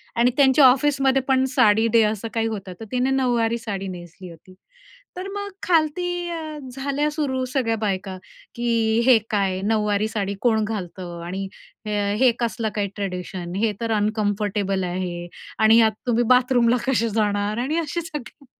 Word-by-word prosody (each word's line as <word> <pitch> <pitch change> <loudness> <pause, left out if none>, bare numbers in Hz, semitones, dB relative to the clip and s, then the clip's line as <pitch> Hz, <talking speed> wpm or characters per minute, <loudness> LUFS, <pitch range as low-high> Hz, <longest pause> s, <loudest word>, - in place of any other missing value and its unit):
आणि 240 +1 +3
त्यांच्या 275 0 +6
ऑफिसमध्ये 270 0 +3
पण 265 -1 +3
साडी 220 +2 +4
डे 230 - +6
असं 220 +1 -5
काही 225 -1 0
होतं, 195 -4 -5
तर 225 - -7
तिने 250 +1 +1
नऊवारी 240 -3 +1
साडी 200 -4 -5
नेसली 180 0 -9
होती. 170 +3 -15 0.6
तर 370 +1 -5
मग 405 0 -4 0.2
खालती 350 +1 +1
अ, 315 -2 -5
झाल्या 280 +3 -1
सुरू 275 -4 -2
सगळ्या 230 -5 +1
बायका, 195 -3 -3 0.4
की 230 -2 +1
"हे 255 -2 +7
काय, 195 -3 0
नऊवारी 210 0 +1
साडी 200 -3 -3
कोण 220 -3 +2
घालतं? 180 -5 -5
आणि 190 +3 -4 0.4
हे 210 +4 +2
कसलं 230 -2 -1
काय 205 -1 0
ट्रेडिशन? 180 -2 -5
हे 215 +2 +1
तर 230 -1 -1
अनकम्फर्टेबल 205 -2 0
आहे 175 -1 -4 0.3
आणि 220 +1 +6
यात 220 -1 +5 0.2
तुम्ही 240 0 +2
बाथरूमला 245 -1 +3
कसे 230 -3 +1
जाणार 205 -1 0
आणि 300 +5 -1
असे 335 +1 -3
सगळे." 300 -3 -9
225 Hz, 155 wpm, -23 LUFS, 200-260 Hz, 0.6 s, हे